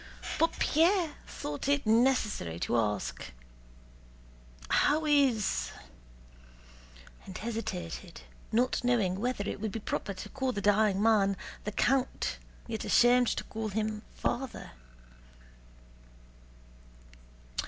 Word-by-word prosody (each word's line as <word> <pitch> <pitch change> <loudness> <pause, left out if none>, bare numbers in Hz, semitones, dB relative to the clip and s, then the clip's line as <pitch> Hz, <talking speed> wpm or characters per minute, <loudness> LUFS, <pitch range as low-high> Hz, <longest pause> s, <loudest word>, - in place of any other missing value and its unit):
But 330 - +2
Pierre 335 0 +3
thought 145 - -5
it 285 -1 +2
necessary 220 - +2
to - - 0
ask: 105 -3 -1 1.4
"How 310 - +3
is..." 245 - +2 1.6
and 185 - -7
hesitated, 195 -6 -5 0.3
not 245 +2 +1
knowing 210 -7 +1
whether 235 -3 -1
it - - -4
would 220 -1 -2
be 225 - -4
proper 200 -1 -3
to 210 - -8
call 265 0 -2
the 205 - -3
dying 205 0 +3
man 200 -3 +3 0.3
"the 210 - -2
count," 260 +4 0 0.3
yet 220 -2 -4
ashamed 245 0 +5
to - - -1
call 220 0 -4
him 215 +1 -2
"father." 260 -1 -3
220 Hz, 105 wpm, -30 LUFS, 200-255 Hz, 1.6 s, ashamed